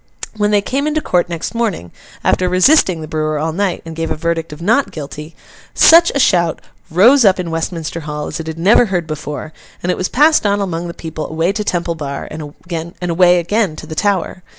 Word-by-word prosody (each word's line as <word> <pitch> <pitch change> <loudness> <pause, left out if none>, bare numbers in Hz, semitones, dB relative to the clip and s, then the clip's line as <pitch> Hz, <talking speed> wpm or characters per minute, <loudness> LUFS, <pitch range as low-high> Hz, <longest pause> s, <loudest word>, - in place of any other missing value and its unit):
When 210 -1 +1
they 205 -1 +2
came 275 +7 -1
into 305 0 0
court 180 - 0
next 170 +4 -4
morning, 215 - -2 0.3
after 180 0 +1
resisting 185 - +4
the 155 - -7
brewer 155 0 -2
all 160 +2 -2
night, 195 0 -1
and 165 -1 -8
gave 165 0 -3
a - - -1
verdict 165 0 -2
of 150 - -9
not 225 +11 +1
guilty, 150 +1 -8 0.4
such 335 +1 +7
a - - +1
shout 175 - +2 0.3
rose 235 - +5
up 190 -3 +4
in 170 -2 -3
Westminster 165 0 -3
Hall 150 -1 -5
as 155 - -5
it 160 - -6
had 160 0 -5
never 200 +8 +4
heard 180 -5 -2
before; 155 -1 -6 0.3
and 180 - +1
it - - -2
was 185 - -1
passed 305 +4 +4
on 205 -1 +1
among 175 -3 -3
the 170 - -7
people 160 -1 -6
away 165 +3 0
to 210 +1 -2
Temple 175 -3 -1
Bar, 145 -4 -6
and 150 -1 -7 0.5
away 180 0 +3
again 185 0 0
to - - -9
the 155 - -7
Tower. 190 0 -1
170 Hz, 215 wpm, -16 LUFS, 160-200 Hz, 0.5 s, such